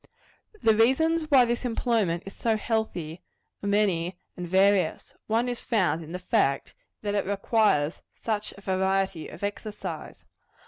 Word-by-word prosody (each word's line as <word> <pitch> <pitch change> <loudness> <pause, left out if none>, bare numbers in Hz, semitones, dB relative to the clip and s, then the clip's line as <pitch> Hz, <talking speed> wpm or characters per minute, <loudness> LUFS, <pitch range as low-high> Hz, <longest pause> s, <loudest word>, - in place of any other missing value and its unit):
The 220 -1 +5
reasons 310 +8 +3
why 265 -4 +7
this 240 +1 -1
employment 225 -8 0
is 195 - -8
so 225 -2 +1
healthy, 185 -8 -2 0.4
are 200 - -3
many 190 -4 +1 0.2
and 180 -1 -5
various. 190 -2 +2
One 230 +3 +1
is 245 -1 -3
found 180 - +1
in 160 - -10
the 180 - -3
fact, 140 -6 0 0.3
that 205 -1 -1
it 205 - +1
requires 200 -6 +1
such 210 -2 -2
a - - -12
variety 190 -2 0
of 165 - -11
exercise. 205 +1 -5
200 Hz, 145 wpm, -27 LUFS, 180-225 Hz, 0.4 s, why